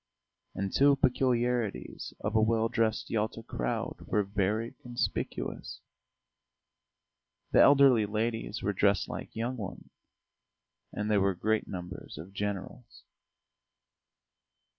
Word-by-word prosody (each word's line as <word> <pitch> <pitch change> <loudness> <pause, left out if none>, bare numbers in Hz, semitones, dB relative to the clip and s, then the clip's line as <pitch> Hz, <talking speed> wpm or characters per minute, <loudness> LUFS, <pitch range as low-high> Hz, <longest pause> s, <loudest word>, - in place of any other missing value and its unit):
And 95 0 -3
two 140 0 +5
peculiarities 125 - 0
of - - -2
a 110 - +5
well 115 +1 +2
dressed 115 -1 0
Yalta 110 +1 -1
crowd 60 - -3
were 105 - +2
very 105 +3 -1
conspicuous: 120 0 -3 1.7
the - - +6
elderly 135 -6 +6
ladies 110 +2 -2
were 100 - 0
dressed 100 0 +2
like - - -7
young 120 +3 -2
ones, 100 -5 -7 1.0
and 105 +1 -2
there 100 -2 +4
were 95 -1 +2
great 110 +4 0
numbers 90 -3 -7
of 85 +6 -9
generals. 100 -1 -5
110 Hz, 110 wpm, -30 LUFS, 100-120 Hz, 1.7 s, the